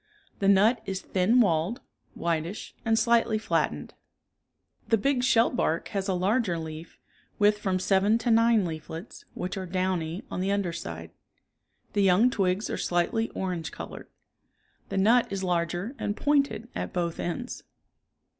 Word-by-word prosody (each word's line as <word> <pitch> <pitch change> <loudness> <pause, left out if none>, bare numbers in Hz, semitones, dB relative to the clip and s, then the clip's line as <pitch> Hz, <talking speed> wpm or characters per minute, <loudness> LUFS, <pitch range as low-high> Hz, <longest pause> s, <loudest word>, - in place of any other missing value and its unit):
The 195 - +1
nut 210 +4 +5
is 190 -1 -2
thin 200 +7 +2
walled, 180 - +1 0.4
whitish 170 +3 -3
and 225 0 +2
slightly 235 -1 +3
flattened. 160 - -1 0.9
The 225 - +3
big 265 +4 +1
shellbark 230 -8 +2
has 195 -1 -2
a 190 - +1
larger 190 0 +1
leaf, 160 0 -8 0.4
with 210 0 +3
from 190 -2 0
seven 195 +3 +3
to 235 +1 0
nine 225 -2 +4
leaflets, 160 +1 -7
which 185 +2 -4
are 190 -1 -4
downy 185 0 -2
on - - -3
the 195 +1 0
under 200 -4 0
side. 85 - -7 0.8
The 205 - +2
young 195 +6 +4
twigs 195 -2 0
are - - -3
slightly 180 +6 0
orange 180 -4 -3
colored. - - -8 0.8
The - - -3
nut 230 +5 +4
is 195 -1 -3
larger 175 - -1
and 205 - -2
pointed 280 -6 +1
at - - -4
both 170 -2 -2
ends. 245 +9 -4
195 Hz, 145 wpm, -27 LUFS, 175-225 Hz, 0.9 s, nut